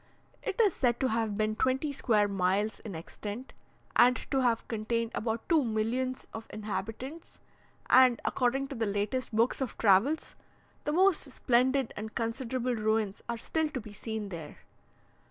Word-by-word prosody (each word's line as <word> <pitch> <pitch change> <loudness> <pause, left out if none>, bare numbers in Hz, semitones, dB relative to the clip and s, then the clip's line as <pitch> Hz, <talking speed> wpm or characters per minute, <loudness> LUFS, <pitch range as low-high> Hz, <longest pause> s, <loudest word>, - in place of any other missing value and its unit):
It 390 - -4
is 415 -6 +5
said 240 -2 +1
to 260 - +2
have 220 -2 0
been 215 0 +1
twenty 260 +5 +1
square 220 -7 +2
miles 200 +2 0
in 205 -6 -7
extent, 205 +9 -7 0.4
and 250 +1 +6 0.2
to 270 - +2
have 235 -2 +1
contained 230 +1 -1
about 225 0 -2
two 320 -4 +4
millions 240 +3 -1
of 225 0 -7
inhabitants, 215 - -6 0.5
and, 255 -2 +6
according 265 +2 +1
to 275 - -5
the 225 -2 -1
latest 205 +6 -1
books 230 +5 +2
of 260 - -3
travels, 225 +10 +3 0.5
the 295 - 0
most 370 +2 +4
splendid 255 +1 +2
and 220 +1 -6
considerable 245 +2 -1
ruins 215 -2 0
are 235 - -1
still 315 +6 -1
to 270 - -4
be 215 -2 -10
seen 220 0 -5
there. 165 -5 -9
230 Hz, 155 wpm, -30 LUFS, 215-260 Hz, 0.5 s, and